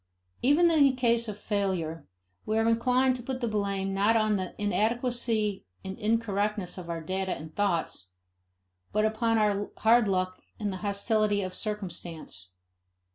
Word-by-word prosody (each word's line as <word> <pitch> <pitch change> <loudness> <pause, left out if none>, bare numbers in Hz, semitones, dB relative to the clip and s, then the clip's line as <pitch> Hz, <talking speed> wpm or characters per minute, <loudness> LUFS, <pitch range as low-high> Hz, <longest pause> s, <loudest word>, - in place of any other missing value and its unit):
Even 320 +6 +4
in 310 -3 +5
the 275 -2 +5
case 235 -2 +1
of 210 -1 -5
failure, 185 -7 -2 0.4
we 215 - -1
are 225 0 +2
inclined 250 +3 +3
to 250 - -6
put 255 +1 -4
the 240 - -1
blame 200 -2 -1
not 205 +4 +3
on 215 -1 +2
the 185 -2 -4
inadequacy 220 0 0 0.2
and 190 0 -5
incorrectness 210 -3 0
of 175 -1 -9
our 165 -1 -3
data 190 +3 -2
and 155 0 -10
thoughts, 170 - -1 0.8
but 215 +1 +2
upon 225 +1 +1
our 205 -1 +1
hard 230 0 +4
luck 185 -1 -1 0.2
and 205 -2 -2
the - - -4
hostility 205 +1 +1
of 185 0 -5
circumstance. 175 - -4
210 Hz, 155 wpm, -28 LUFS, 190-230 Hz, 0.8 s, in